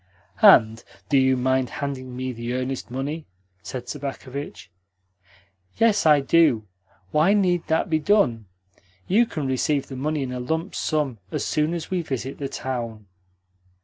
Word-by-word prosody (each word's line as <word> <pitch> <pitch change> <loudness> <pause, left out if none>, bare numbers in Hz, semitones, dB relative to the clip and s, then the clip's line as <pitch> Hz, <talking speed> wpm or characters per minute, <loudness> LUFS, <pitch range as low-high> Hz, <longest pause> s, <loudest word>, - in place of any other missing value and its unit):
"And 110 0 +6 0.3
do 140 - +4
you 130 0 +3
mind 130 0 +1
handing 130 -3 -5
me 130 0 -3
the 120 0 -5
earnest 130 0 -3
money?" 140 +5 -4 0.3
said 125 +2 -7
Sobakevitch. 140 -4 -6 1.1
"Yes, 215 -6 +3
I 150 -2 +6
do. 135 -6 +3 0.5
Why 165 +7 +4
need 180 -4 +1
that 160 0 +1
be 160 -3 +1
done? 140 - +2 0.6
You 225 +5 +4
can 155 -8 -4
receive 135 +2 0
the 135 - -6
money 150 +2 -1
in 130 - -4
a 125 - -4
lump 160 +9 -2
sum 145 -7 -1
as - - -2
soon 155 +3 0
as 165 0 -6
we 185 -2 0
visit 135 -3 -5
the 140 -1 -3
town." 115 -6 -5
135 Hz, 150 wpm, -24 LUFS, 125-155 Hz, 1.1 s, And